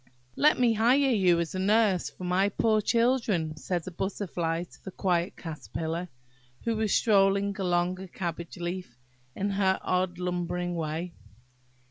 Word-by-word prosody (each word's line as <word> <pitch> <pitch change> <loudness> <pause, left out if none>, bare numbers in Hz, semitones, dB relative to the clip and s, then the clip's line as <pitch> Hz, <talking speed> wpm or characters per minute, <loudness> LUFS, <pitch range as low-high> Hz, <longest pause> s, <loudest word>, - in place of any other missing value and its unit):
"LET 300 -2 +4
me 240 -2 +4
hire 230 +4 +4
you 185 -6 +4
as 170 -1 -2
a 185 - -3
nurse 205 -2 +3
for - - -12
my 185 +3 +2
poor 215 +1 +2
children," 230 -9 +1
said 175 +2 -3
a 185 - -6
Butterfly 175 -3 -2
to 180 - -16
a - - -1
quiet 175 0 0
Caterpillar, 165 +1 -5 0.5
who 230 -1 0
was 215 -2 0
strolling 200 -2 +3
along 180 0 +1
a 190 - -7
cabbage 170 -2 -5
leaf 175 -7 -5 0.4
in 200 +1 -1
her 195 -1 +2
odd 180 -1 0
lumbering 180 0 -2
way. 165 +1 -3
185 Hz, 150 wpm, -28 LUFS, 175-200 Hz, 0.5 s, LET